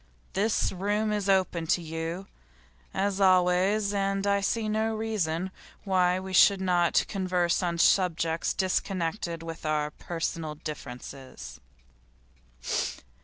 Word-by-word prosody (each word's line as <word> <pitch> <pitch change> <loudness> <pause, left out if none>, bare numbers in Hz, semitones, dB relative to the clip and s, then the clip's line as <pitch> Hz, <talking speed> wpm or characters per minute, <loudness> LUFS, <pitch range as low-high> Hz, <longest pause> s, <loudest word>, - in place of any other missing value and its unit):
This 210 +3 +1
room 205 +3 -1
is 205 -2 -1
open 185 -4 +1
to 175 - +3
you, 165 +3 -4 0.7
as 200 0 -1
always, 190 +2 +3
and 195 0 0
I 200 0 +2
see 220 +2 0
no 220 +1 0
reason 190 -5 -2 0.3
why 185 -2 +2
we 190 0 -7
should 195 +1 +6
not 180 -2 +2
converse 180 -3 0
on 170 -2 -1
subjects 165 -2 +2
disconnected 175 -2 -1
with 165 0 -7
our 150 -1 0
personal 165 -1 -4
differences. 130 - -8
185 Hz, 115 wpm, -28 LUFS, 165-200 Hz, 0.7 s, should